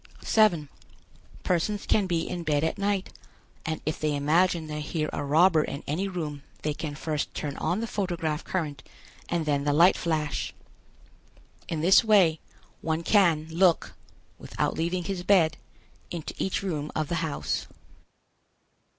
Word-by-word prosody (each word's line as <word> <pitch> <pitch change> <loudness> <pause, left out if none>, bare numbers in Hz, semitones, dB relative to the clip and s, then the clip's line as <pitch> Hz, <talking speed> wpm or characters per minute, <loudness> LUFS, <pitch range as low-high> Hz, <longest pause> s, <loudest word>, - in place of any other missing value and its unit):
7. 185 -9 +3 0.8
Persons 190 +4 0
can 205 -3 +2
be 170 -2 -1
in 175 -1 -4
bed 150 -3 +1
at 160 +5 -1
night, 200 -1 -1 0.5
and 160 -1 -2
if 155 - -2
they 150 -1 0
imagine 160 +4 +2
they 150 -1 -5
hear 155 0 -2
a - - -2
robber 160 +3 +4
in 140 - -5
any 175 +7 -1
room 155 -6 -4 0.2
they 150 - 0
can 150 -1 -5
first 150 -1 -2
turn 145 -2 -3
on 185 +5 -1
the - - -1
photograph 175 -7 -2
current 150 -7 -3 0.5
and 170 -2 0
then 145 -2 +1
the 145 - +1
light 170 +5 +6
flash. 155 -3 -2 1.1
In 160 -2 -2
this 190 +7 +6
way 190 -8 +4 0.4
one 160 +1 -1
can 170 -6 +4
look, 175 0 +3 0.5
without - - -2
leaving 175 +2 -1
his 190 0 -3
bed, 180 -4 +3 0.5
into 170 -3 -5
each 190 +1 -1
room 155 -6 -3
of 155 -1 0
the 170 - -2
house. 160 -3 -2
165 Hz, 150 wpm, -27 LUFS, 150-185 Hz, 1.1 s, light